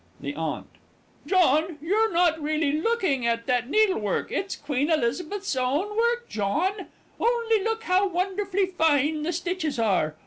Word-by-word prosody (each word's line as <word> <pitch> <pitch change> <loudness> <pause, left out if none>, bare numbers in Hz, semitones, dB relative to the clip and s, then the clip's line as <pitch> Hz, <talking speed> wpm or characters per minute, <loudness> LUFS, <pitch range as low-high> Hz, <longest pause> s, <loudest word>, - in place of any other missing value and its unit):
THE 140 0 -5
AUNT. 160 0 -3 0.6
John, 330 -2 +3
you're 425 +8 +1
not 335 -2 +2
really 305 0 0
looking 315 - 0
at 230 0 -1
that 245 0 0
needlework 375 - +1
it's 390 0 -2
Queen 285 +1 -2
Elizabeth's 320 +6 -1
own 285 +12 -1
work, 475 +1 +1
John. 345 - -1 0.3
Only 460 -2 +1
look 450 +1 -2
how 380 -1 +2
wonderfully 385 +2 -1
fine 315 -4 +1
the 320 +3 -1
stitches 345 -4 -2
are. 190 -9 +1
335 Hz, 140 wpm, -25 LUFS, 275-395 Hz, 0.6 s, John